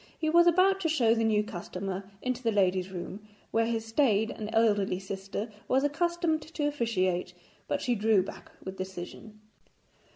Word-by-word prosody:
He 315 Hz, -1 st, 0 dB
was 345 Hz, +1 st, +6 dB
about 370 Hz, +3 st, +4 dB
to 335 Hz, -4 st, 0 dB
show 240 Hz, -8 st, +4 dB
the 225 Hz, -1 st, +1 dB
new 215 Hz, -1 st, +3 dB
customer 195 Hz, -1 st, -5 dB
into 255 Hz, 0 st, -1 dB
the 230 Hz, -2 st, +1 dB
ladies' 185 Hz, -2 st, +2 dB
room, 185 Hz, +2 st, -6 dB, 0.3 s
where 225 Hz, 0 st, +2 dB
his 225 Hz, -1 st, -1 dB
staid 225 Hz, -3 st, +2 dB
and 215 Hz, -1 st, -6 dB
elderly 210 Hz, -4 st, +2 dB
sister 195 Hz, +3 st, -5 dB, 0.2 s
was 265 Hz, +2 st, +2 dB
accustomed 330 Hz, +1 st, +1 dB
to 300 Hz, -1 st, -2 dB
officiate, 185 Hz, -10 st, 0 dB, 0.3 s
but 285 Hz, -, -1 dB
she 245 Hz, -, +2 dB
drew 215 Hz, -3 st, +3 dB
back -, -, -10 dB
with 190 Hz, 0 st, -6 dB
decision. 190 Hz, +3 st, -7 dB
225 Hz, 165 wpm, -29 LUFS, 195-285 Hz, 0.3 s, was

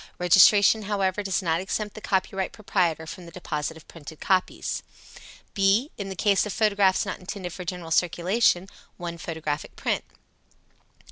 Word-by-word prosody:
Registration, 195 Hz, +4 st, +6 dB
however, 195 Hz, -1 st, 0 dB
does 195 Hz, -1 st, -1 dB
not 165 Hz, 0 st, +1 dB
exempt 210 Hz, +2 st, -3 dB
the 215 Hz, -, -10 dB
copyright 190 Hz, -1 st, -1 dB
proprietor 175 Hz, -6 st, 0 dB
from 170 Hz, +2 st, -9 dB
the -, -, -11 dB
deposit 160 Hz, -3 st, -4 dB
of 160 Hz, -, -16 dB
printed 160 Hz, -1 st, -11 dB
copies. 185 Hz, -1 st, 0 dB, 0.7 s
(b) 200 Hz, +8 st, +2 dB
In 200 Hz, -2 st, -5 dB
the 190 Hz, -, -5 dB
case 200 Hz, +1 st, +3 dB
of -, -, -4 dB
photographs 200 Hz, -3 st, +2 dB
not -, -, -4 dB
intended 180 Hz, -1 st, -6 dB
for 180 Hz, -, -7 dB
general 175 Hz, -2 st, -6 dB
circulation, 180 Hz, +3 st, +2 dB, 0.3 s
one 170 Hz, -1 st, -6 dB
photographic 155 Hz, -3 st, -4 dB
print. -, -, -1 dB
185 Hz, 150 wpm, -25 LUFS, 170-200 Hz, 0.7 s, Registration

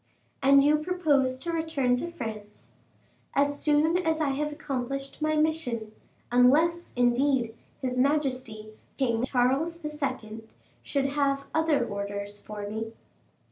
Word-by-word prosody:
"And 275 Hz, 0 st, +6 dB
you 300 Hz, +1 st, +4 dB
propose 300 Hz, -7 st, +1 dB
to 335 Hz, +6 st, -3 dB
return 310 Hz, -6 st, +1 dB
to 340 Hz, -, -3 dB
France?" 215 Hz, -9 st, -8 dB, 0.6 s
"As 285 Hz, +1 st, +2 dB
soon 305 Hz, +3 st, +3 dB
as 320 Hz, -3 st, 0 dB
I 305 Hz, -3 st, +1 dB
have 300 Hz, +2 st, -1 dB
accomplished 275 Hz, -1 st, -4 dB
my 310 Hz, 0 st, +1 dB
mission; 305 Hz, -9 st, 0 dB, 0.4 s
unless, 310 Hz, +8 st, +4 dB
indeed, 245 Hz, -1 st, +2 dB, 0.3 s
his 250 Hz, -1 st, -1 dB
majesty, 255 Hz, -6 st, -1 dB, 0.2 s
King 235 Hz, -4 st, +1 dB
Charles 270 Hz, +7 st, +1 dB
II., 255 Hz, -7 st, -4 dB, 0.4 s
should 280 Hz, -1 st, -1 dB
have 275 Hz, -1 st, 0 dB
other 320 Hz, -6 st, +2 dB
orders 200 Hz, 0 st, -5 dB
for 210 Hz, -1 st, -7 dB
me." 220 Hz, +2 st, -5 dB
275 Hz, 125 wpm, -27 LUFS, 240-305 Hz, 0.6 s, And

